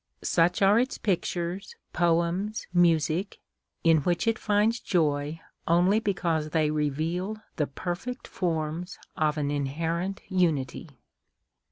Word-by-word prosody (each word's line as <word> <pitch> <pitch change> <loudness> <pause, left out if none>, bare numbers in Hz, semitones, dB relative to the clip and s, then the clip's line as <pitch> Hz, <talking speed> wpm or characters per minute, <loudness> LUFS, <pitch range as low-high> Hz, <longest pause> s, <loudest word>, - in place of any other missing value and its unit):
Such 175 +3 +2
are 200 +3 +6
its 255 +2 -1
pictures, 180 -1 -2 0.2
poems, 175 +5 +1
music, 170 +1 +2 0.4
in 165 -1 +5
which 175 +6 0
it 225 0 +1
finds 215 +3 +2
joy 150 -4 0 0.3
only 180 +5 +4
because 170 -7 -1
they 155 -1 +1
reveal 160 +7 -1 0.2
the 150 - +1
perfect 180 - -5
forms 165 +1 -2 0.2
of 155 -1 +1
an 145 -1 -1
inherent 165 +7 -2
unity. 165 -5 0
170 Hz, 115 wpm, -27 LUFS, 155-195 Hz, 0.4 s, are